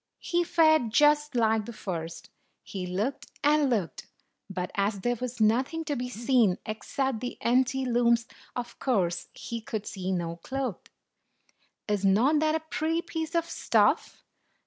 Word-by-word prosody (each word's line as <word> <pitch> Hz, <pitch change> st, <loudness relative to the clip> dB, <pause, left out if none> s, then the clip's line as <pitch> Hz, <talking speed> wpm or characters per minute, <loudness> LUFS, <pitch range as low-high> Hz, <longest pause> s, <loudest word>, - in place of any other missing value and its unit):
He 345 Hz, 0 st, 0 dB
fared 315 Hz, -7 st, +4 dB
just 295 Hz, +2 st, +4 dB
like 220 Hz, -2 st, +2 dB
the 235 Hz, -, -6 dB
first: 170 Hz, -4 st, -6 dB, 0.3 s
he 185 Hz, -2 st, -5 dB
looked 205 Hz, +10 st, -2 dB, 0.2 s
and 295 Hz, -1 st, +4 dB
looked, 195 Hz, -, -2 dB, 0.4 s
but, 180 Hz, -2 st, -4 dB
as 200 Hz, 0 st, 0 dB
there 240 Hz, +3 st, +1 dB
was 245 Hz, 0 st, -5 dB
nothing 260 Hz, +9 st, +2 dB
to 290 Hz, -1 st, -1 dB
be 250 Hz, -1 st, -3 dB
seen 235 Hz, -5 st, +2 dB
except 225 Hz, +3 st, -2 dB
the 245 Hz, +1 st, -5 dB
empty 260 Hz, +2 st, +2 dB
looms, 235 Hz, -1 st, +3 dB, 0.3 s
of 240 Hz, -1 st, -5 dB
course 190 Hz, -10 st, 0 dB
he 230 Hz, -1 st, -5 dB
could 215 Hz, -1 st, -4 dB
see 190 Hz, -2 st, -4 dB
no 170 Hz, -2 st, -2 dB
cloth. 255 Hz, +2 st, -4 dB, 1.0 s
"Is 205 Hz, -2 st, 0 dB
not 230 Hz, +11 st, +4 dB
that 310 Hz, 0 st, +2 dB
a 320 Hz, -, -1 dB
pretty 320 Hz, +1 st, -1 dB
piece 325 Hz, 0 st, -4 dB
of 335 Hz, -1 st, +2 dB
stuff?" -, -, +1 dB
240 Hz, 150 wpm, -28 LUFS, 205-290 Hz, 1.0 s, fared